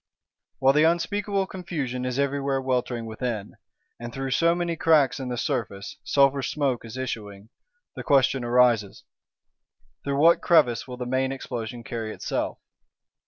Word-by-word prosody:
While 135 0 +4
the 150 +2 +4
unspeakable 195 +4 +1
confusion 150 -10 -4
is 125 0 -2
everywhere 140 -1 0
weltering 125 -3 -1
within, 110 -2 -4 0.4
and 120 0 -6
through 135 +1 -4
so 170 +6 +3
many 175 -1 -1
cracks 155 -5 +3
in 130 -2 -4
the 125 - -3
surface 115 -7 -3
sulphur 140 0 +3
smoke 135 -2 -1
is 115 +2 -9
issuing, 105 -5 -6 0.5
the - - -5
question 135 -2 +3
arises: 120 -4 +2 1.0
Through 140 0 -1
what 165 +4 +5
crevice 140 - +3
will 125 -1 -7
the 125 - -4
main 130 +1 0
Explosion 120 -3 -6
carry 115 -2 -5
itself? - - -3
130 Hz, 145 wpm, -25 LUFS, 120-145 Hz, 1.0 s, what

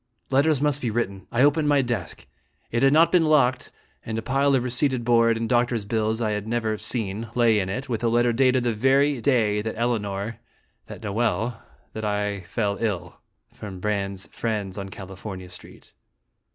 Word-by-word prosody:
Letters 140 +1 +3
must 145 -1 +1
be 120 - -1
written. 100 -4 -3
I 120 +3 +3
opened 150 +1 +3
my 145 -2 +4
desk. 120 - -4 0.5
It 115 - 0
had 135 - +5
not 160 +3 +5
been 175 -3 +4
locked, 130 -5 +2 0.3
and 110 0 -4
a 110 - -3
pile 140 0 +2
of 125 - +1
receipted 125 0 0
board 115 -1 +4
and 115 0 -2
doctor's 120 -2 +1
bills 110 +1 -1
I 110 -2 0
had 105 0 -3
never 110 -2 -1
seen 110 -1 -2
lay 115 -3 +4
in 95 -1 -2
it, 125 +8 -4
with 120 -3 -3
a - - +3
letter 120 +1 +2
dated 130 0 +3
the 120 -1 +1
very 135 +4 +2
day 110 -6 +2
that 110 +1 -5
Elinor 110 -2 -2 0.5
that - - -10
Noel 110 +2 -1 0.3
that 110 - -6
I 105 -1 -1
fell 100 +1 -1
ill, 105 -7 -3 0.3
from 95 -3 -8
Brande's 100 -1 -2
friends 105 -5 -3
on 95 -1 -6
California 95 -1 -8
Street. - - -13
115 Hz, 180 wpm, -24 LUFS, 105-125 Hz, 0.5 s, had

